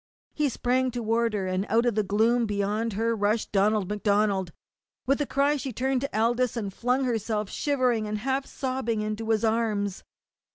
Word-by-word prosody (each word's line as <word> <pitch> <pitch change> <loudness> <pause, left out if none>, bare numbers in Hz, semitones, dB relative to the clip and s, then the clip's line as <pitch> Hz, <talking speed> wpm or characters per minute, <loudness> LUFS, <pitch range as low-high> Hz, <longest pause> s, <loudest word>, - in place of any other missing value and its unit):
He 300 -2 +1
sprang 255 +1 0
toward 230 -1 0
her, 200 -3 -1
and 185 +1 -1
out 230 +2 +3
of 240 - +2
the 215 - +2
gloom 225 +4 +2
beyond 210 +2 -1
her 230 +3 0
rushed 210 +1 0
Donald 205 0 +2
MacDonald. 205 -3 +1 0.5
With 275 +3 +1
a 290 - -1
cry 280 +2 +2
she 270 -1 -4
turned 260 +2 0
to 275 -6 -2
Aldous 240 +1 +1
and 200 -4 -3
flung 250 +5 0
herself 220 -4 -1
shivering 250 -6 0
and 210 0 -2
half 265 +4 -1
sobbing 255 -5 -2
into 215 +1 -3
his 220 0 +2
arms. 215 -3 0
225 Hz, 175 wpm, -26 LUFS, 210-250 Hz, 0.5 s, out